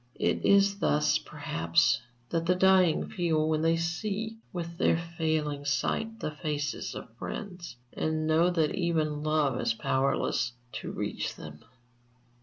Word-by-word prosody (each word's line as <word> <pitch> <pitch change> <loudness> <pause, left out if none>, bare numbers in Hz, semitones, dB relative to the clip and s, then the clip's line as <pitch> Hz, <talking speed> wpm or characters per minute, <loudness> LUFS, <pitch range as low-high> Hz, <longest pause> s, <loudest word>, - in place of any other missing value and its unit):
It - - +1
is 200 0 +4
thus, 150 -5 +2
perhaps, 85 +1 +1 0.3
that 165 0 -1
the 180 - +4
dying 185 -3 +4
feel 160 -4 0
when 155 -1 +1
they 165 +1 +3
see, 210 +6 -3
with 170 -1 -5
their - - +4
failing 160 -4 -2
sight, 225 +10 -1
the 155 - -2
faces 150 0 -3
of - - -9
friends, 180 - -6 0.2
and 155 0 -1
know 160 +3 +4
that 165 -4 +1
even 160 -5 0
love 150 -4 +1
is 115 - +1
powerless 130 -1 0 0.2
to - - -5
reach - - -3
them. 75 -1 -10
160 Hz, 140 wpm, -29 LUFS, 150-180 Hz, 0.3 s, is